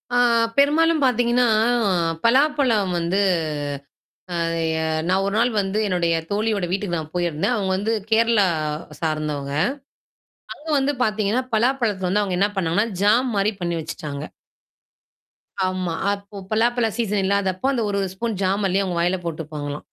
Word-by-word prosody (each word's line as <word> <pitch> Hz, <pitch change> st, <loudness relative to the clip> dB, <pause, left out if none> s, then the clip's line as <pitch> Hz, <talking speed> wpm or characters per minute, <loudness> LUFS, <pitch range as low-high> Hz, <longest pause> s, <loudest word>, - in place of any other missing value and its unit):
ஆ -, -, +4 dB, 0.4 s
பெரும்பாலும் 310 Hz, +3 st, +4 dB
பாத்தீங்கன்னா, 245 Hz, 0 st, +2 dB, 0.8 s
பலாப்பழம் 255 Hz, -6 st, +3 dB
வந்து 170 Hz, +3 st, 0 dB, 1.9 s
நான் 190 Hz, +1 st, +2 dB
ஒரு 200 Hz, +1 st, -1 dB
நாள் 240 Hz, +2 st, +3 dB
வந்து 195 Hz, +1 st, -2 dB
என்னுடைய 175 Hz, -3 st, +1 dB, 0.2 s
தோழியோட 205 Hz, -2 st, 0 dB
வீட்டுக்கு 190 Hz, -2 st, -1 dB
நான் 155 Hz, 0 st, -7 dB
போயிருந்தேன். 175 Hz, +5 st, 0 dB
அவங்க 200 Hz, -4 st, -1 dB
வந்து 205 Hz, +4 st, -1 dB, 0.2 s
கேரளா 225 Hz, -2 st, +4 dB, 0.5 s
சார்ந்தவங்க. 150 Hz, -3 st, -2 dB, 1.0 s
அங்க 310 Hz, -, -14 dB
வந்து 275 Hz, +1 st, +1 dB
பாத்தீங்கன்னா, 215 Hz, +3 st, 0 dB
பலாப்பழத்தல 220 Hz, -5 st, +1 dB
வந்து 205 Hz, +3 st, +2 dB
அவங்க 185 Hz, -3 st, -2 dB
என்ன 200 Hz, +2 st, +3 dB
பண்ணாங்கன்னா, 190 Hz, +5 st, +1 dB
ஜாம் 235 Hz, +5 st, +3 dB
மாரி 200 Hz, +2 st, +2 dB
பண்ணி 170 Hz, -1 st, -1 dB
வெச்சுட்டாங்க. 150 Hz, -3 st, -6 dB, 1.4 s
ஆமா. 185 Hz, -2 st, -2 dB, 0.2 s
அப்போ 200 Hz, 0 st, -9 dB
பலாப்பலா 230 Hz, +1 st, +2 dB
சீசன் 210 Hz, -4 st, 0 dB
இல்லாதப்போ 195 Hz, +2 st, 0 dB
அந்த 240 Hz, -3 st, 0 dB
ஒரு 200 Hz, -, -1 dB
ஒரு 190 Hz, -, -2 dB
ஸ்பூன் 225 Hz, 0 st, -3 dB
ஜாம் 195 Hz, +2 st, +1 dB
அல்லி 195 Hz, +2 st, +1 dB
அவங்க 180 Hz, -3 st, -3 dB
வாயில 180 Hz, +2 st, +1 dB
போட்டுப்பாங்களா. 150 Hz, -3 st, -5 dB
200 Hz, 130 wpm, -22 LUFS, 180-230 Hz, 1.9 s, ஆ